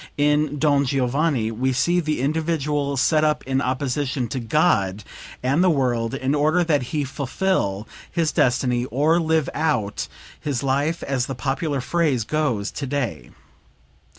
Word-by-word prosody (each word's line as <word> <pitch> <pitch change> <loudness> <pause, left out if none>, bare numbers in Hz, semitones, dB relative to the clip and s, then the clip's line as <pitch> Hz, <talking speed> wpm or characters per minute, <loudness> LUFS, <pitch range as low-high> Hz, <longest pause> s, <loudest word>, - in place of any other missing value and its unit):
In 150 0 +2
"Don 145 -1 +3
Giovanni" 135 -2 0
we 130 +4 0
see 170 +8 +2
the 155 -5 -1
individual 150 -1 -1
set 155 +4 +3
up 150 0 +1
in 135 +1 0
opposition 130 0 -1
to 130 - -3
God 110 - +1 0.4
and 140 +7 +2
the 185 - +5
world, 125 -5 0
in 135 0 -1
order 155 +4 +3
that 155 -5 +2
he 150 -2 -1
fulfill 135 - -1 0.2
his 165 -3 +1
destiny, 125 -1 +1
or 150 +6 +2
live 160 -3 +1
out 140 -10 -1 0.3
his 140 -4 -2
life, 140 +5 0
as 130 -3 -1
the 135 - -4
popular 135 +2 -2
phrase 150 -5 +1
goes 125 -7 -1
today. 135 - -3
140 Hz, 145 wpm, -22 LUFS, 125-155 Hz, 0.4 s, the